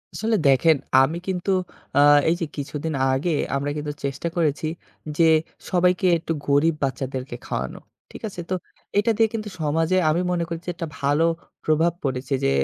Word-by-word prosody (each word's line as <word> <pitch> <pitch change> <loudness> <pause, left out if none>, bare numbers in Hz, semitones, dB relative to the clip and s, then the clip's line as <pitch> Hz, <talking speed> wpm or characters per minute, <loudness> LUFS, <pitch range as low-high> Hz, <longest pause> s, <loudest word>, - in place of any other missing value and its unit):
আসলে 220 0 0
দেখেন, 145 +4 +5 0.2
আমি 145 +5 +1
কিন্তু 190 0 -1 0.5
আ - - +7 0.3
এই 165 - +3
যে - - +1
কিছুদিন 145 +2 -3 0.2
আগে 135 +7 0 0.2
আমরা 140 +1 -1
কিন্তু 150 0 -3
চেষ্টা 140 +4 -2
করেছি, 160 -2 0 0.5
যে 170 - +5 0.5
সবাইকে 180 +1 +3
একটু 165 0 -5 0.2
গরিব 145 +3 +3
বাচ্চাদেরকে 130 -1 -3
খাওয়ানো। - - -4 0.3
ঠিক - - -11
আছে? 180 - -7
তো 185 - +1 0.4
এটা 225 +3 +2
দিয়ে 225 0 +4
কিন্তু 215 -2 -3
সমাজে 160 +4 +1
আমি 165 +3 +2
মনে 175 -1 0
করছি 170 +1 -6
একটা 165 - -4
ভালো 145 +3 +2 0.4
প্রভাব 160 +2 +3
পড়েছে, 130 -1 -2
যে - - +3
160 Hz, 160 wpm, -23 LUFS, 140-175 Hz, 0.5 s, আ